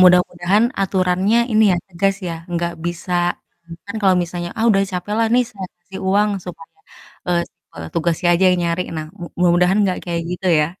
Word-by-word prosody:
mudah-mudahan 180 +3 +4 0.2
aturannya 190 +2 +1 0.2
ini 220 0 +4
ya - - +2
tegas 195 +2 0
ya, 170 - -3 0.3
gak 170 0 -1
bisa, 175 +1 -4 0.5
mmm, 170 - -9
kan 200 - -7
kalo 190 -2 +5
misalnya, 175 0 -5
"Ah, 225 - +1
udah 195 -2 +3
capek 180 +3 -3
lah, 230 - +3
nih 250 0 +4
saya 195 -2 -7
kasih 190 +2 -10
uang 205 +2 +3
supaya, 175 - -11 0.5
eee, 175 -1 +2
si - - -52 0.2
petugasnya 170 +1 -2
aja 190 +2 +2
yang 180 - +1
nyari." 170 +1 0
Nah, 155 0 -4 0.3
mudah-mudahan 180 +2 +3
gak 185 - -1
kayak 170 -1 -2
gitu 180 +2 -4
ya. 150 - +2
180 Hz, 185 wpm, -19 LUFS, 175-195 Hz, 0.5 s, kalo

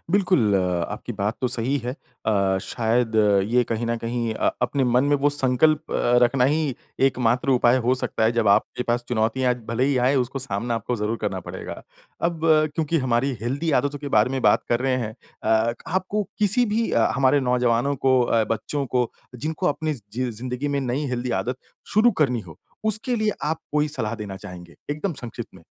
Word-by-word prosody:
बिल्कुल 180 - +3 0.4
आपकी - - -5
बात 105 +3 -2
तो 125 - +1
सही 125 +3 -1
है। 125 - -2 0.3
अ, 100 -3 +2
शायद 115 0 0 0.4
ये 125 +1 +4
कहीं 115 +1 -1
न 115 0 0
कहीं 115 -1 -2
अ, - - +1
अपने 135 +2 +1
मन 125 +2 +3
में 145 0 +3
वो 145 +1 +2
संकल्प 145 +3 +2
अ, - - -3 0.3
रखना 125 +1 +2
ही 150 -1 +1 0.3
एक 130 - -1
मात्र 125 +3 +1
उपाय 125 -1 +4
हो 130 - +4
सकता 125 -3 -1
है 115 - +3
जब 115 -3 +1
आपके 105 +4 +2
पास 120 0 -1
चुनौतियाँ 125 +2 +1
भले 120 +3 +1
ही 140 -1 +1
आए 135 - +3
उसको 125 +2 -1
सामना 120 -2 -2
आपको 120 +1 -2
ज़रूर 105 +2 -1
करना 95 -1 -2
पड़ेगा। - - -8 0.4
अब 170 -1 0 0.3
क्योंकि 160 +1 0
हमारी 130 +1 +1
हेल्दी 140 +7 -1
आदतों 145 0 -3
के 145 0 -6
बारे 110 +1 +3
में 135 -1 -1
बात - - +4
कर 120 +1 +1
रहे 130 -1 +1
हैं 110 -3 -3 0.3
अ, 110 +1 +2
आपको 190 +4 -1 0.2
किसी 215 +4 +3
भी 230 0 +1
हमारे 135 +4 +3
नौजवानों 125 +1 +1
को 130 -1 +3
अ, 115 -2 +2
बच्चों 135 +5 -2
को 125 -1 0 0.2
जिनको 155 +8 -3
अपनी 155 +1 -1
ज़ 125 - -10
जि 130 +2 -1
अ, 120 - -3
ज़िन्दगी 125 +5 -4
में 140 -1 0
नयी 135 +3 -2
हेल्दी 125 0 -2
आदत 125 +1 -3 0.4
शुरू 230 +3 +6
करनी 125 -4 +1
हो, 85 -5 -13 0.3
उसके 220 +4 +1
लिए 215 -1 +1
आप 160 +2 -1
कोई 150 0 +2
सलाह 125 -7 -3
देना 105 -4 -6
चाहेंगे? 90 -2 -10 0.2
एकदम 160 +5 -2
संक्षिप्त 120 -3 -7
में। 90 - -15
125 Hz, 200 wpm, -23 LUFS, 115-145 Hz, 0.4 s, शुरू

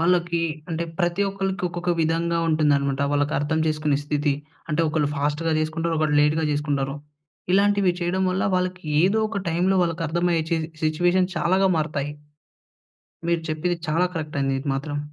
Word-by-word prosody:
వాళ్ళకి 170 0 +2 0.3
అంటే 165 +1 -1
ప్రతి 175 +2 +1
ఒక్కళ్ళకి 195 -1 -3
ఒక్కొక్క 175 +1 -3
విధంగా 165 +1 +1
ఉంటుందన్నమాట. 140 -3 +2
వాళ్ళకి 145 +1 +1
అర్థం 150 +3 0
చేసుకునే 155 -2 +1
స్థితి. 145 -1 0 0.3
అంటే, 155 +1 +1
ఒకళ్ళు 150 -2 +1
ఫాస్ట్‌గా 150 +3 0
చేసుకుంటారు. 165 +2 -1
ఒకరు 155 -1 +1
లేట్‌గా 150 +2 +2
చేసుకుంటారు. 145 -2 -1 0.6
ఇలాంటివి 200 -1 +4
చేయడం 175 +2 0
వల్ల 185 +1 0
వాళ్ళకి 185 0 -1 0.2
ఏదో 195 +6 +3
ఒక 205 -2 -3
టైంలో 180 +3 +2
వాళ్ళకి 165 -1 -1
అర్థమయ్యే 170 0 +1
చే 165 - +2 0.3
సిట్యుయేషన్ 175 +4 +2
చాలాగా 185 +3 +3
మారుతాయి. 150 -2 -1 1.2
మీరు 170 -1 +1
చెప్పింది 165 +3 -1
చాలా 165 +4 +2
కరెక్ట్ 155 -3 -4
అండి. 135 0 +1
ఇది 140 - -6
మాత్రం. 145 +1 -3
165 Hz, 150 wpm, -24 LUFS, 150-175 Hz, 1.2 s, ఇలాంటివి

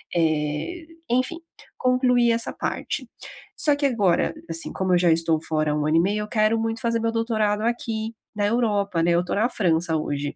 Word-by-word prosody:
eh, 160 - -1 0.2
enfim. 255 +7 0 0.4
Concluí 250 -1 +3
essa 230 0 0
parte. - - -4 0.5
Só 295 -2 +3
que 285 0 -1
agora, 205 -10 +2 0.2
assim, 165 0 -3
como 190 -1 0
eu - - +5
já 175 -1 +3
estou 160 -1 +2
fora 155 -2 -1
há - - 0
1 150 -1 -1
ano 155 +2 +3
e - - +6
meio, 200 +5 +1
eu - - -7
quero 215 +1 +2
muito 225 0 -2
fazer 230 -1 0
meu 230 0 0
doutorado 220 -2 0
aqui 225 -1 -2 0.2
na 205 -1 +1
Europa, 205 -6 +1
né. 175 - +3
Eu 170 +1 +2
tô - - -2
na 215 +4 +2
França 170 -7 +1
hoje. 145 -1 -3
210 Hz, 195 wpm, -24 LUFS, 165-230 Hz, 0.5 s, e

